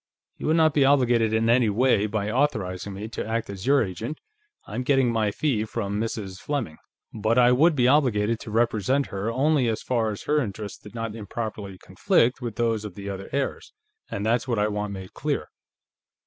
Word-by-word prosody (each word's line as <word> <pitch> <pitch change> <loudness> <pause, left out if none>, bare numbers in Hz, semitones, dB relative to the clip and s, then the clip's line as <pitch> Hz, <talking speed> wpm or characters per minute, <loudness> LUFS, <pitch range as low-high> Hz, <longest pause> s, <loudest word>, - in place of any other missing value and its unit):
You - - -4
will 155 - +3
not 160 -2 +4
be 140 - +4
obligated 120 -5 +3
in 110 +1 +1
any 120 -1 +4
way 110 -1 +2
by 105 0 -2
authorizing 105 -8 -1
me 105 +3 -6
to - - -4
act 115 -1 -3
as 95 +3 -7
your 140 -1 +5
agent 110 - -5 0.5
I'm 110 +4 -4
getting 135 -2 +2
my 110 -2 +1
fee 110 0 0
from 105 -2 -3
Mrs. 100 -4 -4
Fleming 130 - -3 0.4
but 110 +2 0
I 125 0 +6
would 155 +6 +4
be 125 -3 +3
obligated 115 -6 +2
to - - -9
represent 115 +4 +1
her 100 +3 -2
only 135 +1 +2
as 110 -1 -2
far 115 -3 0
as 105 - -6
her 150 0 +2
interests 105 -3 -5
did 105 - -13
not 115 -2 -3
improperly 105 -2 -6
conflict 125 +7 +1
with 120 -3 -4
those 115 -2 0
of 105 -4 -7
the 100 0 -5
other 95 0 -7
heirs, 140 - -3 0.4
and 100 - -3
that's 115 +3 +1
what 120 -3 0
I 105 +1 +2
want 105 0 -3
made 95 -2 -8
clear." - - -2
115 Hz, 200 wpm, -25 LUFS, 105-125 Hz, 0.5 s, I